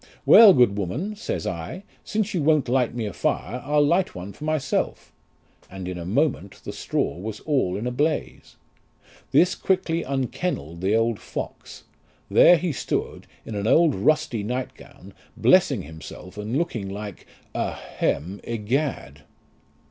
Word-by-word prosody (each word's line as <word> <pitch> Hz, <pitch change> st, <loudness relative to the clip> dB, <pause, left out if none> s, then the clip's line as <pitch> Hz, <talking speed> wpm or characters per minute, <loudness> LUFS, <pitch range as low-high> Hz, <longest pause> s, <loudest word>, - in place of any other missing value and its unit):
Well! 225 Hz, -3 st, +10 dB
good 105 Hz, -5 st, +4 dB
woman, 140 Hz, -, -3 dB
says 95 Hz, -, -4 dB
I, 90 Hz, -, -5 dB, 0.2 s
since 215 Hz, -1 st, -2 dB
you 175 Hz, -, 0 dB
won't 150 Hz, -2 st, +3 dB
light 125 Hz, -1 st, +1 dB
me 115 Hz, -2 st, -2 dB
a 100 Hz, -, -4 dB
fire, 125 Hz, +3 st, -2 dB
I'll 145 Hz, +1 st, +3 dB
light 175 Hz, +5 st, +1 dB
one 90 Hz, +3 st, -7 dB
for 150 Hz, -, -8 dB
myself; 155 Hz, -3 st, -1 dB, 0.6 s
and 95 Hz, -1 st, -7 dB
in 90 Hz, -1 st, -5 dB
a 85 Hz, -, -6 dB
moment 115 Hz, -, -1 dB
the -, -, -6 dB
straw -, -, -2 dB
was 105 Hz, +3 st, -6 dB
all 130 Hz, -12 st, 0 dB
in 110 Hz, -, -4 dB
a 125 Hz, -, -1 dB
blaze. 150 Hz, +5 st, -2 dB, 0.7 s
This 180 Hz, +1 st, +4 dB
quickly 180 Hz, -3 st, 0 dB
unkennelled 130 Hz, -, -3 dB
the 100 Hz, +3 st, +2 dB
old 115 Hz, -1 st, +1 dB
fox; -, -, -7 dB, 0.5 s
there 175 Hz, -, +7 dB
he 170 Hz, +1 st, -1 dB
stood 135 Hz, -, -3 dB, 0.2 s
in 115 Hz, -, -7 dB
an 100 Hz, 0 st, -2 dB
old 160 Hz, +3 st, +5 dB
rusty 120 Hz, 0 st, +1 dB
night 125 Hz, +5 st, -3 dB
gown, -, -, -15 dB, 0.2 s
blessing -, -, +4 dB
himself, 80 Hz, +4 st, -10 dB
and 105 Hz, +5 st, -3 dB
looking 120 Hz, -12 st, -2 dB
like 100 Hz, -1 st, -7 dB, 0.3 s
a -, -, -1 dB
hem 95 Hz, +6 st, -3 dB
egad." 115 Hz, -, -2 dB
120 Hz, 155 wpm, -24 LUFS, 100-155 Hz, 0.7 s, Well